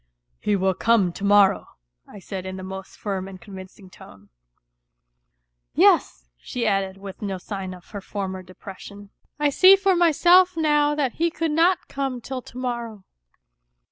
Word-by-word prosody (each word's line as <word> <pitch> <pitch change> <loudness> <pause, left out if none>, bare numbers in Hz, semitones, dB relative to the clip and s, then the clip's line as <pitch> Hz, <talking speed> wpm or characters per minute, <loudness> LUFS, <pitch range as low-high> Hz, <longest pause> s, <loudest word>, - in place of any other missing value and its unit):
" - - -47
He 205 - +3
will 190 0 +1
come 205 -5 +2
to 200 - -9
morrow," 200 -1 +4 0.4
I - - -13
said 190 -1 -7
in 190 0 -6
the 185 - -8
most 190 0 -9
firm 195 -2 -4
and 190 -1 -10
con 200 - -14
vincing 190 0 -12
tone. 100 - -16 0.7
" - - -56 0.7
Yes," - - +3
she 235 - -4
added 195 -2 0
with 195 0 -10
no 195 -2 -3
sign 190 0 -6
of 180 - -18
her 205 -2 -6
former 190 -1 -5
depression. 195 +2 -12
" - - -44
I 295 -1 +2
see 375 +7 +7
for 390 -1 +2
myself 350 +2 +4
now 295 -2 +2
that 280 -4 0
he 335 - +3
could 330 -1 -2
not 335 +3 +2
come 270 -2 -3
till 255 +2 -6
to 245 - -14
morrow. 235 -5 -5
205 Hz, 175 wpm, -23 LUFS, 190-285 Hz, 0.7 s, see